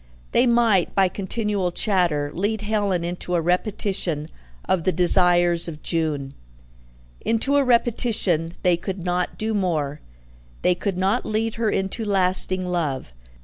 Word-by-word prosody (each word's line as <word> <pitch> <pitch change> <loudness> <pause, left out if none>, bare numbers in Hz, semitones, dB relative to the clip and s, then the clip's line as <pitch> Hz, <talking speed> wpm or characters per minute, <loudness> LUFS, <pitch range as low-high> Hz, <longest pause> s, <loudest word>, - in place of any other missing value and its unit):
They 245 +2 +3
might, 230 -6 +2
by 190 -2 +3
continual 200 -1 -2
chatter, 175 -8 +1
lead 205 +4 -1
Helen 205 -4 -1
into 175 +1 -3
a - - +2
repetition 180 -3 -1 0.4
of 185 -3 0
the 185 - +2
desires 175 -1 +4
of 155 -2 -8
June. 150 -5 -1 0.9
Into 230 +5 +1
a 285 - +4
repetition 225 -9 +1
they 180 -2 +3
could 185 +1 -6
not 180 0 -1
do 220 +1 -2
more; 155 -7 -1 0.6
they 180 - +4
could 185 +1 -3
not 195 +6 +1
lead 220 +1 -2
her 220 - +2
into 195 +4 -2
lasting 185 -2 +2
love. 155 - -3
185 Hz, 140 wpm, -22 LUFS, 170-210 Hz, 0.9 s, desires